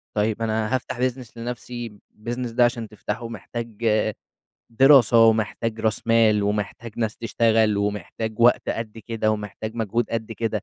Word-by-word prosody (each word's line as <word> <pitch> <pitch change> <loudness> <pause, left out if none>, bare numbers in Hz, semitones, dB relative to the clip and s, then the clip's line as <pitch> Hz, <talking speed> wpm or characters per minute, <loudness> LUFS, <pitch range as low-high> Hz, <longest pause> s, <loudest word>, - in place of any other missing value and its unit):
طيب 110 +1 0
أنا 110 +2 0
هافتَح 130 -1 -4
business 125 -1 -2
لنَفْسي، 120 0 -5 0.2
الbusiness 120 +2 -4
ده 120 +1 +4
عشان 120 -2 -2
تفتحه 105 +2 -5
محتاج 115 +1 -7 0.9
دراسة، 120 -2 +6
ومحتاج 110 0 0
راس 110 0 -1
مال، 110 -2 +4
ومحتاج 105 +2 -3
ناس 110 -2 -1
تشتغل، 115 -2 +2
ومحتاج 105 +2 -3
وقت 120 +1 +4
قد 115 -1 -4
كده، 110 0 -1
ومحتاج 110 +1 -4
مجهود 115 +1 -1
قد 115 -1 -3
كده 110 -2 -2
115 Hz, 140 wpm, -23 LUFS, 110-120 Hz, 0.9 s, دراسة